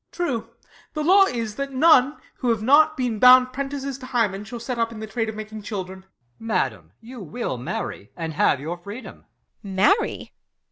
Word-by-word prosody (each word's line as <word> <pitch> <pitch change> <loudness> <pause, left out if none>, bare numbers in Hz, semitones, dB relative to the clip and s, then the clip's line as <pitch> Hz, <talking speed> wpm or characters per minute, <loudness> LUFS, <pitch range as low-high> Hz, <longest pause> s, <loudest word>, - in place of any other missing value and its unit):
Ben. - - -25
True, 230 -5 -3 0.5
the 305 - -1
law 390 +5 +6
is, 230 - -4
that 275 0 -4
none, 285 -1 +5 0.2
who 250 - -1
have 225 -2 0
not 310 +5 +5
been 245 -4 -2
Bound 255 +1 +7
prentices 275 0 -4
to 255 - -9
Hymen, 215 -6 0
shall 240 +2 -7
set 235 +1 -4
up 230 0 0
In 230 - -9
the 220 - -5
trade 225 +1 -3
of 220 - -6
making 215 0 -7
children. 190 -2 -6
EscH. 190 - -21 0.3
Madam, 120 - -2
you 245 +2 -11
will 175 - -5
marry, 115 -4 -5
and 165 -2 -4
have 145 - +2
your 165 +5 -5
freedom. 200 +8 -10 0.4
Beat. 200 - -8
Marry 215 - +1
230 Hz, 195 wpm, -23 LUFS, 200-260 Hz, 0.5 s, Bound